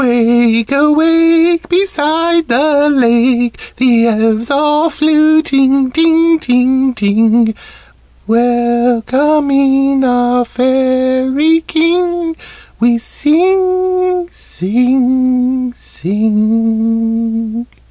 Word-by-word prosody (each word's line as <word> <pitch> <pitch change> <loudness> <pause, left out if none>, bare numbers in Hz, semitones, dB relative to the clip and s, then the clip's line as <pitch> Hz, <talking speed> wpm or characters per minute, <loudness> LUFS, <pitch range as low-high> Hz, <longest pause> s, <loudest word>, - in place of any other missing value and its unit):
Wake, 240 -1 +1
oh, 290 +2 +2
wake! 330 +2 +2
Beside 335 -3 0
the 290 +4 +1
lake 240 -2 +1 0.2
The 235 -2 +2
elves 225 +1 -1
are 295 +3 +1
fluting, 300 -3 +1
ting, 325 +2 +2
ting, 260 0 0
ting! 220 +2 +1 0.7
Welcoming 265 +4 0
our 245 -1 +1
Fairy 260 +4 0
King, 340 0 -1 0.4
We 235 0 +2
sing, 365 +5 -1
sing, 255 +4 -1
sing." 225 +2 -2
260 Hz, 70 wpm, -12 LUFS, 235-315 Hz, 0.7 s, oh